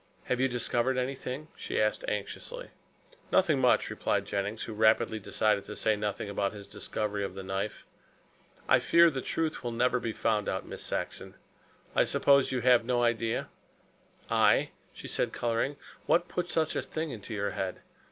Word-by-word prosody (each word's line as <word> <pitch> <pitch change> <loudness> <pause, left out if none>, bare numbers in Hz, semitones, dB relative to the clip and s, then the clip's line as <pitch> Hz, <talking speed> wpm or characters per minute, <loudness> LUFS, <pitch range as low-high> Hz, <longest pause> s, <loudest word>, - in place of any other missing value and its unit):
"Have 125 - -1
you 130 - +4
discovered 125 +1 0
anything?" 130 +3 -3
she - - -3
asked - - +1
anxiously. - - -4 0.6
"Nothing 165 -7 +4
much," 125 - +3
replied - - 0
Jennings, 100 +2 -2
who 110 - -6
rapidly 110 0 +3
decided 105 0 +1
to 105 - -7
say 110 - +2
nothing 105 0 -3
about 100 0 -1
his 100 -1 -9
discovery 105 0 -3
of 95 - -4
the 95 - -6
knife. 95 +2 -4 0.8
"I - - +6
fear 170 0 +5
the 135 -2 -3
truth 160 -1 -2
will 120 - -2
never 125 +2 +2
be 115 -2 -2
found 105 -1 0
out, 95 - -2
Miss - - -8
Saxon. - - -4 0.6
I - - +5
suppose 140 -1 +4
you 130 -2 -1
have 125 -1 +5
no 120 0 +1
idea?" 115 -1 0 0.8
"I," - - +3 0.2
she - - -9
said, - - -1
coloring, 120 +4 -1 0.3
"what 175 +1 +3
put 175 -1 -3
such 160 -2 0
a - - +1
thing 160 -1 -4
into 110 -1 -6
your 100 0 -1
head? 95 -1 -4
120 Hz, 170 wpm, -30 LUFS, 105-135 Hz, 0.8 s, I